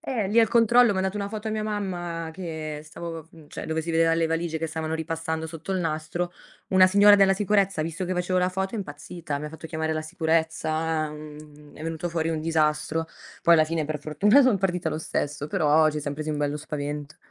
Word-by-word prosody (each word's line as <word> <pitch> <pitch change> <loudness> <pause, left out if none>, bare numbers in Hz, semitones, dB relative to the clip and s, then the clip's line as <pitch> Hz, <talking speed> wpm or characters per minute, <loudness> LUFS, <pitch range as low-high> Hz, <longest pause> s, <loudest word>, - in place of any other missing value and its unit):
eh, 240 -10 -2
lì 220 - +2
al 230 - +6
controllo 235 0 +5
ho - - -5
mandato 190 +1 -1
una 200 -1 -2
foto 215 +1 -5
a - - -2
mia 215 0 -2
mamma 175 -6 -3
che 160 -4 -5
stavo, 165 0 -8 0.2
cioè - - -7
dove 160 0 -1
si 165 - -4
vedeva 165 0 +3
le 165 0 +2
valigie 165 0 -1
che 165 0 -3
stavano 160 0 -3
ripassando 160 0 -3
sotto 165 +4 -6
il 185 - 0
nastro. 165 +2 -2 0.4
Una 185 0 +6
signora 205 +2 +7
della 195 -1 +5
sicurezza, 200 -3 +1
ha 155 - 0
visto 165 +3 -4
che 185 - -2
facevo 180 +1 0
la 180 0 +2
foto, 190 +3 -3
è - - -3
impazzita. 150 -2 -6
Mi 150 - -5
fatto 160 +1 -9
chiamare 160 0 -2
la 155 - -2
sicurezza, 160 -1 0
uhm, 150 -1 -12
è - - -10
venuto 165 +1 -3
fuori 165 -1 -1
un 160 -1 -1
disastro. 160 0 0 0.4
Poi 170 - +6
alla 155 -1 +5
fine 160 -1 -2
per 150 0 -3
fortuna 200 - +4
son 255 -6 +4
partita 180 -3 -1
lo 155 0 -3
stesso, 145 -1 -3
però 155 -4 +4
ci 150 - -3
siam 145 0 -4
presi 155 +1 -4
un 150 - -2
bello 145 0 -1
spavento. 150 -1 -5
165 Hz, 220 wpm, -25 LUFS, 155-185 Hz, 0.4 s, signora